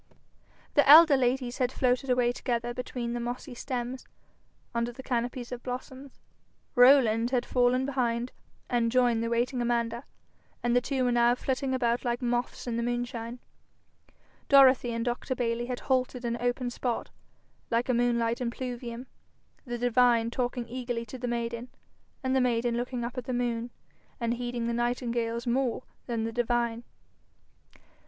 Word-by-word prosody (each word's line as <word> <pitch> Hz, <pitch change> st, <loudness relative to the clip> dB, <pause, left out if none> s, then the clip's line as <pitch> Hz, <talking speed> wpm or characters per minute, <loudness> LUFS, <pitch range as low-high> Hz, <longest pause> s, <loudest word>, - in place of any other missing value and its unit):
The 290 Hz, -1 st, +4 dB
elder 310 Hz, 0 st, +10 dB
ladies 250 Hz, -1 st, 0 dB
had 250 Hz, -1 st, +1 dB
floated 255 Hz, +1 st, 0 dB
away 245 Hz, -1 st, +3 dB
together 240 Hz, -1 st, -2 dB
between 245 Hz, -1 st, -4 dB
the 240 Hz, -, -2 dB
mossy 245 Hz, +2 st, -5 dB
stems, 250 Hz, 0 st, -5 dB, 0.7 s
under 235 Hz, 0 st, -1 dB
the 265 Hz, +2 st, -11 dB
canopies 245 Hz, 0 st, -2 dB
of 245 Hz, -1 st, -5 dB
blossoms; 260 Hz, +2 st, -7 dB, 0.5 s
Rowland 245 Hz, -3 st, +5 dB
had 250 Hz, -2 st, 0 dB
fallen 250 Hz, +1 st, +2 dB
behind 245 Hz, -3 st, -1 dB, 0.4 s
and 235 Hz, -2 st, +1 dB
joined 240 Hz, -2 st, +3 dB
the 230 Hz, -, -1 dB
waiting 240 Hz, +2 st, 0 dB
Amanda, 235 Hz, 0 st, -1 dB, 0.6 s
and 240 Hz, 0 st, +2 dB
the 245 Hz, -, +4 dB
two 265 Hz, 0 st, -1 dB
were 250 Hz, -, +2 dB
now 240 Hz, 0 st, +4 dB
flitting 260 Hz, +1 st, -1 dB
about 240 Hz, -1 st, 0 dB
like 240 Hz, -1 st, -1 dB
moths 245 Hz, 0 st, -2 dB
in 235 Hz, -2 st, -2 dB
the -, -, 0 dB
moonshine; 240 Hz, 0 st, -3 dB, 1.1 s
Dorothy 265 Hz, -3 st, +6 dB
and 230 Hz, 0 st, -2 dB
Dr. 245 Hz, +2 st, -2 dB
Bayly 240 Hz, -1 st, -1 dB
had 250 Hz, -1 st, -4 dB
halted 255 Hz, -1 st, 0 dB
in 235 Hz, 0 st, -1 dB
an 235 Hz, -, -8 dB
open 245 Hz, 0 st, -1 dB
spot, 240 Hz, -1 st, -3 dB, 0.6 s
like 235 Hz, +1 st, +1 dB
a 255 Hz, -, +2 dB
moonlight 235 Hz, 0 st, +1 dB
impluvium, 240 Hz, 0 st, -5 dB, 0.6 s
the 240 Hz, -2 st, -4 dB
divine 240 Hz, -1 st, +3 dB
talking 245 Hz, -1 st, -2 dB
eagerly 240 Hz, -1 st, -4 dB
to 250 Hz, +3 st, -9 dB
the 245 Hz, -, -3 dB
maiden, 235 Hz, 0 st, -3 dB, 0.5 s
and 260 Hz, 0 st, +1 dB
the 265 Hz, -, +4 dB
maiden 240 Hz, -1 st, +1 dB
looking 245 Hz, 0 st, -3 dB
up 250 Hz, +2 st, -4 dB
at 245 Hz, -, -9 dB
the 255 Hz, -, -3 dB
moon, 240 Hz, -1 st, -1 dB, 0.5 s
and 235 Hz, -1 st, 0 dB
heeding 240 Hz, -1 st, -3 dB
the 235 Hz, -, -1 dB
nightingales 235 Hz, -1 st, -1 dB
more 250 Hz, 0 st, 0 dB, 0.2 s
than 230 Hz, -2 st, -1 dB
the 225 Hz, -, -2 dB
divine. 235 Hz, 0 st, 0 dB
245 Hz, 160 wpm, -28 LUFS, 235-250 Hz, 1.1 s, elder